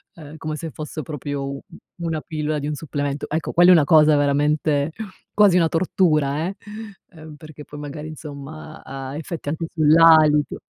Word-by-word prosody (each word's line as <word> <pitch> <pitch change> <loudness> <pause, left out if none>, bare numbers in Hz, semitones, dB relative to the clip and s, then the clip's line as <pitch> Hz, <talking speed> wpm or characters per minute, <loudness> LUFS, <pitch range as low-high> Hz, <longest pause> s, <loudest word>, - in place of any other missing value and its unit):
uhm, 155 -1 -11
come 155 0 -5
se 165 +1 -6
fosse 155 +2 -7
proprio 145 0 -5
u 140 0 -6 0.4
una 165 -2 -2
pillola 155 -1 -3
di 145 - -4
un 150 - -3
supplemento. 145 -1 -4
Ecco, 160 +1 -2
quella 175 +2 +6
è - - +9
una 165 -4 +5
cosa 155 -1 +5
veramente 145 +1 +1 0.4
quasi 205 -4 +5
una 165 -2 +3
tortura, 160 -3 +1
eh! 195 - -5 0.8
Perché 155 -1 -12
poi 150 - -10
magari 150 +1 -7
insomma, 155 0 -10
ha 135 0 -7
effetti 160 -1 -6
anche 160 +2 -3
sull'alito. 155 -2 +5
155 Hz, 160 wpm, -21 LUFS, 145-160 Hz, 0.8 s, è